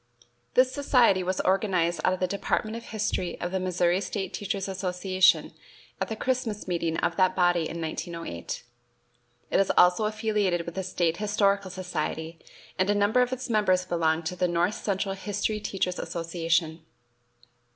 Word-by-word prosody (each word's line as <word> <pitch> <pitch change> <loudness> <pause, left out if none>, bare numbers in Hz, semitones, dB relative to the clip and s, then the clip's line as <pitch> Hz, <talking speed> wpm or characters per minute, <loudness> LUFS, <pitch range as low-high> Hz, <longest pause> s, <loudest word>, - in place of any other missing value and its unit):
This 255 0 +5
society 250 -9 +4
was 185 +1 -2
organized 185 -3 +1
out 185 - +3
of 185 - -4
the 185 - +2
Department 210 +3 -1
of 230 - -7
History 215 -4 -2
of 175 - -3
the 190 - 0
Missouri 180 0 +1
State 195 -2 -4
Teachers' 200 -1 -3
Association 185 0 +2 0.5
at - - 0
the 220 - -4
Christmas 240 -4 -2
meeting 170 -2 -1
of 170 - -1
that 185 -1 +3
body 175 -3 +2
in 170 - -5
1908. 165 - -5 0.9
It - - +3
is 195 - +3
also 180 +4 +5
affiliated 210 -5 0
with 170 - -6
the 190 - -3
State 175 -3 0
Historical 200 -2 +1
Society, 170 -3 -4 0.4
and 185 +2 +2
a 205 - +3
number 205 +5 +3
of 250 0 +1
its 260 0 -4
members 205 -5 +2
belong 165 -2 +1
to 160 +3 -3
the 180 - +1
North 175 +3 +1
Central 195 -2 -2
History 205 +2 -2
Teachers' 185 -3 -2
Association. 165 -1 -1
185 Hz, 160 wpm, -27 LUFS, 175-205 Hz, 0.9 s, This